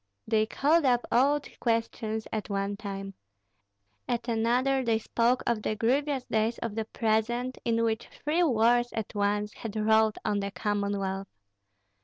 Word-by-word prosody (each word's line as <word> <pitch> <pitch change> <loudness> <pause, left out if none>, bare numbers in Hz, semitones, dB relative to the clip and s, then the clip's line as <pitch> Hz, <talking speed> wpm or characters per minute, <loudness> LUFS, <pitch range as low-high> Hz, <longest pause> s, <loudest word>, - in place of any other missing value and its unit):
They 220 -1 +2
called 305 +8 +2
up 245 -3 +2
old 280 +4 +3
questions 225 -2 -1
at 215 -1 -3
one 200 0 -1
time; 195 -1 -6 0.9
at 235 0 -2
another 245 +4 +2
they 230 -2 +2
spoke 235 +3 +1
of 235 -2 0
the 215 - -1
grievous 265 +4 0
days 220 +2 0
of 230 -3 -4
the 220 0 -2
present, 235 +3 -1
in 230 0 +2
which 225 0 -1
three 310 +4 -1
wars 240 -4 +3
at 220 -2 -4
once 205 0 0
had 225 -2 -7
rolled 220 0 +3
on 205 -1 +1
the 200 0 -2
Commonwealth. 200 -2 -2
225 Hz, 150 wpm, -28 LUFS, 210-240 Hz, 0.9 s, old